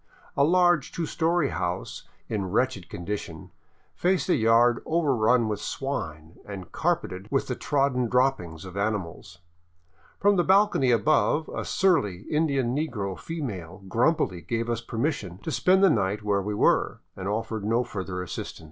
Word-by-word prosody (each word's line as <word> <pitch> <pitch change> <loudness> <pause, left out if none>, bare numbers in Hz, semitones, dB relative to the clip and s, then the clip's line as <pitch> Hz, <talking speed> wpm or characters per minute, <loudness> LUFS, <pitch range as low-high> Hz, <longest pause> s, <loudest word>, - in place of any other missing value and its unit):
A 140 - +3
large 175 -2 +3
two 170 - -3
story 165 -2 +1
house - - -4 0.2
in 100 -4 -2
wretched 105 -4 0
condition 85 -3 -6 0.4
faced 185 +1 0
a - - +5
yard 115 0 +4
overrun 125 -8 +2
with 105 -1 -2
swine 80 - -5
and 95 -4 -8
carpeted 90 +2 -1
with 135 - +1
the 125 - -3
trodden 135 -4 0
droppings 115 -10 0
of 95 0 -9
animals. 100 -4 -3 0.8
From 205 0 +4
the 175 - +4
bal 195 +4 +5
cony 135 -9 +1
above, 150 +5 +2
a - - -4
surly 105 - +1
Indian 140 -6 +1
negro 115 -11 -2
female 100 - -6
grumpily 115 - +1
gave 115 +7 -2
us 115 -1 -2
permission 115 - -3
to 160 - -3
spend 190 +5 +3
the 195 - +7
night 105 -3 0
where 100 -1 +1
we 105 +2 -3
were, - - +2
and 95 0 -5
offered 110 +1 -2
no 115 +4 +1
further 95 -5 -5
assistance. 90 - -6
115 Hz, 155 wpm, -26 LUFS, 95-150 Hz, 0.8 s, the